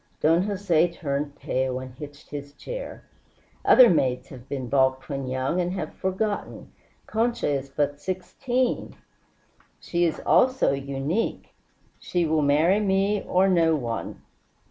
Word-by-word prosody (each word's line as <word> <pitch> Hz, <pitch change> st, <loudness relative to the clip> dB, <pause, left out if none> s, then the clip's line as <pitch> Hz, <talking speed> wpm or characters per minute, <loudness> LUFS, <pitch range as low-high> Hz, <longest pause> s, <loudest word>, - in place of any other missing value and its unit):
Don 165 Hz, +3 st, +4 dB
Jose 185 Hz, -4 st, +2 dB
turned 145 Hz, -3 st, -3 dB
pale 130 Hz, 0 st, -2 dB
and 130 Hz, -1 st, -9 dB
hitched 145 Hz, +2 st, -11 dB
his 145 Hz, -1 st, -7 dB
chair. -, -, -7 dB, 0.6 s
"Other 255 Hz, -2 st, +8 dB
maids 130 Hz, -, +1 dB
have 130 Hz, -1 st, -12 dB
been 130 Hz, -3 st, -4 dB
balked 130 Hz, 0 st, +2 dB
when 135 Hz, -2 st, -3 dB
young, 130 Hz, +7 st, -1 dB
and 175 Hz, +1 st, -2 dB
have 170 Hz, -5 st, -4 dB
forgotten. 200 Hz, +2 st, -3 dB, 0.3 s
Concha 235 Hz, +2 st, 0 dB
is 140 Hz, -2 st, -1 dB
but 145 Hz, +1 st, -1 dB
sixteen 240 Hz, -, -2 dB, 0.4 s
" -, -, -39 dB, 0.3 s
"She 175 Hz, 0 st, 0 dB
is 165 Hz, -, -1 dB
also 255 Hz, -, +4 dB
unique. 140 Hz, +9 st, -3 dB, 0.5 s
She 175 Hz, -2 st, -1 dB
will 155 Hz, -1 st, +2 dB
marry 155 Hz, +7 st, +3 dB
me 200 Hz, 0 st, +1 dB
or 185 Hz, +2 st, +2 dB
no 165 Hz, -4 st, +3 dB
one. 120 Hz, -5 st, -4 dB
155 Hz, 140 wpm, -25 LUFS, 140-190 Hz, 0.6 s, Other